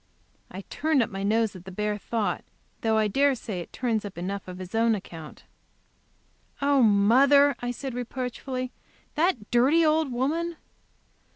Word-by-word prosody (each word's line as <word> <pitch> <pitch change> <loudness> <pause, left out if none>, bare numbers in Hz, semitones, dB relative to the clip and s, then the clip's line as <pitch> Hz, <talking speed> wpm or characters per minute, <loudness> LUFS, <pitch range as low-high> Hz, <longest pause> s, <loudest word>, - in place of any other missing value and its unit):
I 190 - -7
turned 300 +5 +1
up - - -5
my 195 0 -5
nose 220 +1 +1
at 180 - -10
the 190 - -8
bare 210 +2 -1
thought, 205 -5 -2 0.4
though 220 -1 +2
I 215 -1 +3
dare 275 +6 +2
say 210 -6 -5
it 170 - -8
turns 230 -4 -1
up 200 -3 -8
enough 190 +2 -4
on 180 0 -8
its 185 -1 -8
own 225 0 +3
account. 165 -6 -10 1.2
"Oh, 280 -1 +3
mother!" 260 +7 +5
I 245 - -3
said, 260 +1 -5
reproachfully 255 +1 -4 0.4
"that 300 - 0
dirty 275 +8 +4
old 310 -2 +2
woman!" 320 +8 -1
235 Hz, 160 wpm, -26 LUFS, 200-275 Hz, 1.2 s, mother